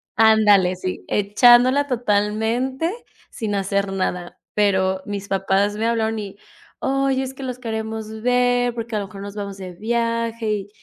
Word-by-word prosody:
ándale, 210 -4 +5
sí, 185 0 -5
echándola 245 +7 +5
totalmente, 235 - 0 0.4
sin 215 -3 -4
hacer 200 0 -1
nada, 180 -2 -3 0.2
pero, 190 -2 +2
mis 200 -1 -5
papás 195 +1 +1
me 220 - -1
hablaron 225 -1 0
y: 200 -1 -7 0.4
"Oye, 270 0 +1
es 265 0 -6
que 270 - -9
los 255 -1 -5
queremos 220 -1 -5
ver 245 0 +2
porque 230 -1 -4
a - - +1
lo 200 - -5
mejor 195 0 -10
nos 200 0 -8
vamos 200 -1 -5
de 185 -2 -8
viaje, 230 +2 -1
y 205 -1 -3
220 Hz, 155 wpm, -21 LUFS, 200-240 Hz, 0.4 s, ándale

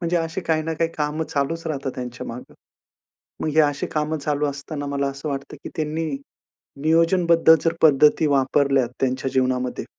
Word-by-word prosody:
म्हणजे 170 0 0
अशी 165 +2 -2
काही 160 -1 0
ना 165 - -3
काही 165 +1 0
कामं 150 +2 -1
चालूचं 160 +3 -2
राहतात 135 -2 -3
त्यांच्या 125 -1 -6
मागे. 120 +2 -9 0.9
मग - - -1
हे 160 - +6
अशी 145 -2 +1
कामं 155 +1 -1
चालू 150 0 -1
असताना 145 +1 -5
मला 140 0 -1
असं 140 +2 -6
वाटतं 140 -1 -5
की - - -4
त्यांनी 155 +1 -2 0.7
नियोजनबद्ध 165 +1 +4
जर 165 0 +1
पद्धती 150 +1 +5
वापरल्या 135 -1 +2
त्यांच्या 130 0 0
जीवनामध्ये 130 -1 0
150 Hz, 160 wpm, -22 LUFS, 140-160 Hz, 0.9 s, हे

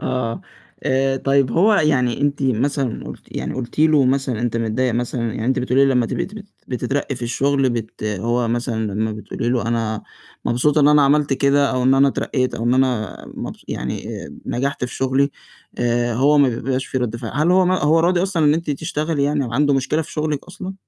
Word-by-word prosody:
آه. 120 -3 -2 0.4
آآ، 135 0 +1
طيب، 135 -1 +2
هو 205 +6 +4
يعني 135 -8 +2
أنتِ 145 0 0
مثلًا 130 0 0
قُلتِ - - -10
يعني - - -3
قُلتِ 130 +1 -6
له 155 -3 +5
مثلًا: 130 -3 0
"أنت 120 -1 -1
متضايِّق 115 +2 0
مثلًا" 120 +1 -2
يعني، 110 - -4
أنتِ 130 +1 +1
بتقولي 130 +2 +3
لي 135 - +3
لمَّا 125 -2 +2
تبقي - - -2
تبقي 210 +1 -10 0.2
بتترقَّي 135 +3 -2
في 120 - -10
الشغل، 135 +2 +1
بت 115 -2 -5
هو 115 +4 -1
مثلًا 115 -3 -2
لمَّا 110 +2 -1
بتقولي 110 +2 -4
له: 120 -2 0
"أنا 115 -2 -1 0.4
مبسوطة 145 +5 +2
إن 145 - +5
أنا 150 -1 +6
عملت 145 0 +3
كده، 140 +1 +3
أو 130 -1 0
إن 130 +1 +4
أنا 135 +1 +5
اترقَّيت، 130 -1 -1
أو 115 - -4
إن 120 +1 +3
أنا 130 -4 0 0.2
مبس - - -7
يعني، - - -4 0.4
نجحت 135 +1 -2
في 125 - -6
شغلي،" 135 +2 +1 0.5
آآ، 120 0 +1
هو 140 +5 +4
ما 140 -2 +5
بيبقاش 130 +2 -2
في 130 - -2
رد 120 -2 -2
فعل، 115 -1 -6
هل 155 +5 +2
هو 185 +1 +5
ما 185 +1 +2
هو 155 +2 +4
راضي 175 +1 +2
أصلًا 185 -4 0
إن 150 0 +5
أنتِ 165 -1 -3
تشتغلي 150 +1 -2
يعني 145 0 +1
وعنده 140 +4 +1
مشكلة 135 +4 0
في - - -12
شغلِك 150 -2 -2
أصلًا؟ 185 +1 -8
130 Hz, 205 wpm, -20 LUFS, 120-145 Hz, 0.5 s, أنا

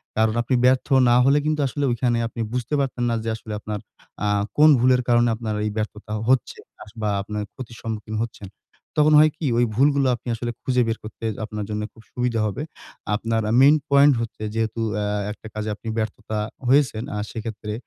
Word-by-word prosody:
কারণ 110 0 +2
আপনি 125 +2 0
ব্যর্থ 130 0 +3 0.2
না 120 - +5
হলে 140 +2 +5
কিন্তু 155 -1 +1
আসলে 145 +2 -3
ওইখানে 120 0 +1
আপনি 115 0 -6
বুঝতে 125 +3 -3
পারতেন 130 -3 -1
না 115 - +1
যে 115 - -2
আসলে 110 -1 -8
আপনার 105 0 -5 0.5
আ - - +2 0.3
কোন 155 +1 +7
ভুলের 125 +1 +4
কারণে 120 0 +4
আপনার 110 -1 -4
এই 105 - -1
ব্যর্থতা 105 0 -4
হচ্ছে। 130 -2 +2 0.3
আস 105 - -15
বা 105 - 0
আপনার 105 +1 -4
ক্ষতির 115 -3 -9
সম্মুখীন 110 -1 -5
হচ্ছেন। 105 -4 -8 0.5
তখন 150 +1 +5
হয় 155 0 +6
কি? 160 - -4
ওই 120 - +4
ভুলগুলো 140 +2 +3
আপনি 120 - -15
আসলে 120 +1 -3
খুঁজে 125 -1 +2
বের 115 0 -1
করতে 110 +1 -8 0.2
আপনার 105 -1 -5
জন্য 105 0 -2
খুব 110 - -17
সুবিধা 125 -2 -1
হবে। 105 +8 -4 0.5
আপনার 115 +1 -1
আ - - +1
মেইন 145 +3 +7
পয়েন্ট 140 +1 +6
হচ্ছে 115 -1 -6
যেহেতু 115 0 -1 0.2
অ্যা 105 - -1 0.3
একটা 110 - -10
কাজে 110 0 -3
আপনি 115 - -12
ব্যর্থতা 110 0 -3 0.3
হয়েছেন, 130 -4 +3
আ - - -2
সেক্ষেত্রে 110 -2 -5
115 Hz, 195 wpm, -23 LUFS, 110-130 Hz, 0.5 s, কোন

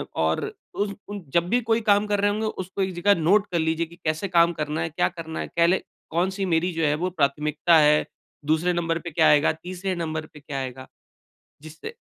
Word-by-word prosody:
और 80 0 +1 0.3
उस 200 0 -2 0.2
उन 205 -3 -6
जब 170 +1 +2
भी 245 - +3
कोई 225 0 +1
काम 205 +1 +3
कर 205 -1 0
रहे 205 0 +3
होंगे, 215 +1 -2
उसको 190 -1 -5
एक 190 -1 -1
जग़ह 200 +4 +3
नोट 200 +6 +4
कर 170 - +1
लीजिए 160 +1 0
कि 170 - -15
कैसे 155 +5 -1
काम 170 -1 +4
करना 150 +1 -2
है, 165 - -1
क्या 175 +3 0
करना 165 -2 -7
है? - - -4
कह 170 0 +2
ले 185 +2 +3 0.3
कौन-सी 190 +4 0
मेरी 175 +1 +1
जो 160 -1 0
है 150 0 +2
वो 185 - +1
प्राथमिकता 150 +1 +2
है। 150 0 +4 0.4
दूसरे 160 +4 +2
नंबर 165 -1 -1
पे 170 -1 -7
क्या 160 +1 +4
आएगा, 150 +1 +5
तीसरे 185 +1 -3
नंबर 155 -2 -3
पे 150 - -12
क्या 140 -1 -5
आएगा? 130 0 -6 0.8
जिससे 160 - -9
170 Hz, 220 wpm, -24 LUFS, 155-190 Hz, 0.8 s, आएगा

